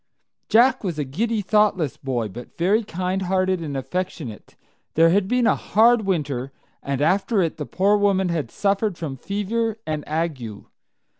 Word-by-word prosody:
Jack 255 +3 +4
was 175 -6 -3
a 150 - 0
giddy, 210 - -1
thoughtless 195 - +2
boy, 125 -5 -2
but 120 +5 -11
very 200 +7 +2
kindhearted 185 -1 -1
and 145 -4 -4
affectionate. 135 - -5 0.4
There 165 +1 +5
had 190 +1 +2
been 245 +2 +2
a - - +4
hard 225 0 +3
winter, 140 -8 -1 0.3
and 140 0 -2
after 195 +6 +2
it 165 - -2
the 150 - -5
poor 200 +2 +2
woman 195 -2 +2
had 160 -8 -2
suffered 200 - 0
from 150 -5 -4
fever 210 - -2
and 155 -1 -3
ague. 150 -10 -3
185 Hz, 155 wpm, -23 LUFS, 150-205 Hz, 0.4 s, There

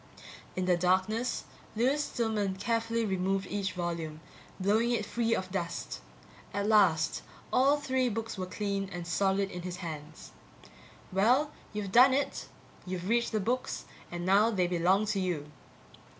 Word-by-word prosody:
In 185 - -1
the 180 -1 +4
darkness, 190 +7 +1 0.3
Lewis 265 +6 +2
Stillman 215 -5 -1
carefully 230 +2 0
removed 195 0 0
each 200 -1 -1
volume, 170 -3 -3 0.4
blowing 215 +5 +2
it 235 -3 0
free 230 +1 0
of 185 0 -4
dust. 180 -3 -4 0.5
At 200 0 0
last 190 -7 +4 0.3
all 275 +3 +5
three 260 -3 0
books 225 0 -4
were 185 -2 -4
clean 200 0 -2
and 175 -1 -5
solid 195 +2 +1
in 180 - -5
his 180 0 -5
hands. 155 -3 -8 0.8
Well, 250 +10 +3 0.2
you've 210 -2 -4
done 255 +4 +7
it. 280 - -2 0.4
You've 185 0 -4
reached 235 +1 +2
the 215 - +1
books 250 +6 -2 0.3
and 175 0 -4
now 200 +4 +5
they 190 -5 +1
belong 180 +4 +2
to 205 -1 0
you. 165 -6 -2
200 Hz, 150 wpm, -30 LUFS, 180-230 Hz, 0.8 s, done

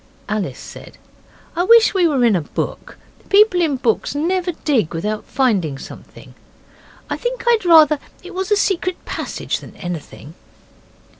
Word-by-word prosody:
Alice 210 -2 -3
said, - - -12 0.6
'I 350 +2 +1
wish 460 +1 +6
we 365 -3 +3
were 270 -6 +2
in 225 -4 +4
a 175 - +1
book. 145 - -5 0.3
People 400 -3 +5
in 310 -5 +1
books 245 +1 -1
never 355 +4 0
dig 230 - +1
without 210 +6 -3
finding 200 - 0
something. - - -12 0.7
I - - -3
think - - -4
I'd 465 -5 +2
rather 315 -3 +6 0.2
it 370 +1 -10
was 380 +2 -3
a 415 - +4
secret 370 -2 -1
passage - - -4
than - - -13
anything. 165 -4 -8
305 Hz, 150 wpm, -19 LUFS, -, 0.7 s, wish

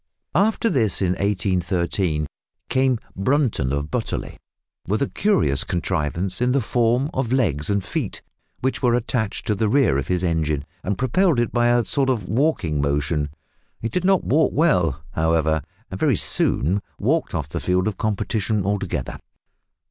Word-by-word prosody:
After 210 +6 +2
this, 120 - +1
in 95 - +1
1813, 90 -4 0 0.4
came 130 -1 +2 0.2
Brunton 110 - +1
of 70 +1 -2
Butterley, - - -3 0.5
with 105 +4 +1
a - - 0
curious 185 - +1
contrivance 85 - -2
in 125 0 +2
the 140 - +3
form 120 +4 +1
of 130 -3 -1
legs 90 - +1
and 100 -2 0
feet, - - -4 0.4
which 130 +1 -1
were 120 -3 +3
attached 110 -3 -2
to 105 - +1
the 105 +1 0
rear 115 - +3
of 70 - -4
his 90 0 0
engine 80 -4 0 0.2
and 100 +2 -1
propelled 140 +4 +2
it 120 - 0
by 120 -1 +2
a 120 -1 +3
sort 135 -2 +1
of 110 -8 -1
walking 110 - +1
motion. 75 +1 0 0.5
It 115 - -2
did 180 - -1
not 190 0 +3
walk 155 +4 +2
well, 90 - +2
however, 80 0 +1 0.3
and - - -5
very - - +3
soon 95 +8 +1 0.2
walked 150 - 0
off 75 -4 -3
the - - -3
field 90 +1 +1
of 105 -3 -2
competition 105 -1 -1
altogether. 95 -9 -2
100 Hz, 160 wpm, -22 LUFS, 80-130 Hz, 0.5 s, the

